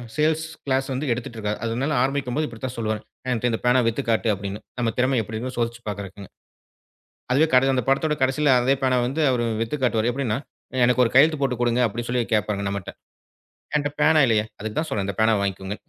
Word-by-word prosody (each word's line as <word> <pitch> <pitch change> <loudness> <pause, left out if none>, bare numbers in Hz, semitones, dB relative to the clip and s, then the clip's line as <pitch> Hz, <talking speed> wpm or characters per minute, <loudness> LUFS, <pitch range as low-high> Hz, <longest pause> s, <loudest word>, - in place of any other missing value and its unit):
Sales 155 +1 +1 0.2
class 135 -1 0
வந்து 135 +2 -2
எடுத்துட்டு 120 -1 -4
இருக்கார். 105 -1 -3
அதனால 125 +6 -1
ஆரம்பிக்கும்போது 140 +2 -1
இப்படித்தான் 120 +2 -6
சொல்லுவாரு. 110 -2 -2 0.3
என்ட்ட 125 0 0
இந்த 115 - -1
பேனா 125 +1 +5
வித்து 115 +5 -1
காட்டு 115 0 +2
அப்படின்னு. 100 +1 -5 0.2
நம்ம 115 -2 +1
திறம 130 +1 +2
எப்படிருக்குன்னு 115 +4 -5
சோதிச்சு 120 0 -2
பாக்கிறதுக்குனு. 100 -1 -6 1.0
அதுவே 145 +5 +4
கட 130 +1 +5
அந்தப் 130 -1 -1
படத்தோட 150 +3 +2
கடசியில 135 +3 +2
அதே 130 +3 +3
பேனாவ 130 -2 +2
வந்து 140 +5 -3
அவர் 125 -2 +1 0.2
வித்து 115 +6 -2
காட்டுவாரு. 115 -1 +2
எப்படின்னா, 125 -4 -1 0.5
எனக்கு 125 +1 +4
ஒரு 115 - 0
கையெழுத்து 150 +3 +5
போட்டுக் 125 -3 0
குடுங்க 120 +1 +2
அப்படின்னு 120 +2 -4
சொல்லி 125 -1 +1
கேப்பாருங்க 105 -1 0
நம்மட்ட. 100 -2 -4 0.9
என்ட்ட 145 -1 0
பேனா 155 +1 +5
இல்லையே, 110 -3 +2 0.2
அதுக்கு 110 0 -4
தான் 160 - -4
சொல்றேன், 100 -6 -1
இந்தப் 100 +1 -4
பேனாவ 110 -2 +3
வாங்கிக்கோங்க. 95 0 -3
120 Hz, 190 wpm, -23 LUFS, 110-135 Hz, 1.0 s, பேனா